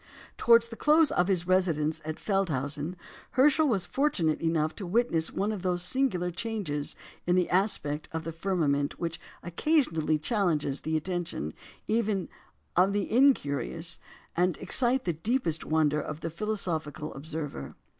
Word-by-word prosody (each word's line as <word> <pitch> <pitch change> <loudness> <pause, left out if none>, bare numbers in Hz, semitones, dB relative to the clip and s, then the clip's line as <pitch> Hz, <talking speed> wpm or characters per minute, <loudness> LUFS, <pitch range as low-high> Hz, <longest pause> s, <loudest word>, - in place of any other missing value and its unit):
" - - -21
Towards 235 0 +5
the 230 - -7
close 305 +4 +4
of 180 - +2
his 180 -3 +1
residence 160 -4 +1
at 155 0 -4
Feldhausen, 155 -4 -1 0.4
Herschel 295 +4 +4
was 205 -9 +1
fortunate 205 - 0
enough 160 -1 0
to 195 - -5
witness 175 -5 +1
one 205 +3 -1
of 210 -4 -4
those 180 -1 0
singular 180 -5 0
changes 185 -8 -3 0.3
in 175 - +3
the 180 -1 +2
aspect 165 -6 +1
of 160 -1 -4
the 165 - -4
firmament 160 -5 0
which 165 -1 -3 0.2
occasionally 170 - +1
challenge 155 - 0
the 160 0 0
attention 170 - -3 0.3
even 215 -4 0 0.5
of 185 +3 +4
the 205 -1 -1
incurious, 170 - +2 0.4
and 180 0 +2
excite 250 +7 +2
the 175 - +1
deepest 165 - -1
wonder 150 -1 +2
of 155 +1 -6
the 165 - -3
philosophical 165 -6 -3
observer. 145 - -6
175 Hz, 145 wpm, -28 LUFS, 155-210 Hz, 0.5 s, Towards